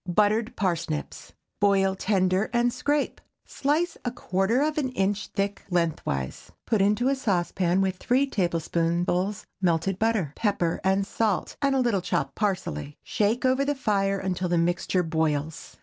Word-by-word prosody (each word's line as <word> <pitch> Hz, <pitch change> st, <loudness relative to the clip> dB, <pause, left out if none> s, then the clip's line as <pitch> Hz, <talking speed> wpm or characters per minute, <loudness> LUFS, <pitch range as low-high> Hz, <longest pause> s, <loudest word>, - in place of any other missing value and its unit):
BUTTERED 215 Hz, +6 st, +2 dB
PARSNIPS. 170 Hz, -5 st, -3 dB, 0.3 s
Boil 195 Hz, -1 st, +3 dB
tender 190 Hz, 0 st, +1 dB
and 240 Hz, 0 st, +2 dB
scrape. 290 Hz, 0 st, -1 dB, 0.2 s
Slice 305 Hz, +5 st, -1 dB
a 245 Hz, -, 0 dB
quarter 225 Hz, +2 st, 0 dB
of 305 Hz, 0 st, 0 dB
an 265 Hz, -3 st, -1 dB
inch 195 Hz, -1 st, 0 dB
thick 200 Hz, 0 st, -2 dB
lengthwise. 160 Hz, -, -2 dB
Put 220 Hz, -3 st, +2 dB
into 210 Hz, +5 st, +2 dB
a 275 Hz, -, +3 dB
saucepan 185 Hz, -5 st, +1 dB
with 190 Hz, -1 st, 0 dB
three 255 Hz, +7 st, +2 dB
tablespoonfuls 175 Hz, -, 0 dB, 0.2 s
melted 180 Hz, +1 st, +1 dB
butter, 215 Hz, -10 st, +1 dB
pepper 200 Hz, -6 st, 0 dB
and 190 Hz, +1 st, +2 dB
salt, 210 Hz, -2 st, -1 dB
and 275 Hz, -1 st, +2 dB
a -, -, +2 dB
little 235 Hz, -7 st, +1 dB
chopped 140 Hz, -6 st, -1 dB
parsley. 180 Hz, -, -2 dB
Shake 220 Hz, +5 st, 0 dB
over 260 Hz, +2 st, +3 dB
the 290 Hz, +1 st, 0 dB
fire 195 Hz, -6 st, +1 dB
until 185 Hz, -1 st, -2 dB
the 175 Hz, -, +2 dB
mixture 175 Hz, +2 st, +1 dB
boils. 160 Hz, -2 st, -2 dB
195 Hz, 150 wpm, -26 LUFS, 175-225 Hz, 0.3 s, Boil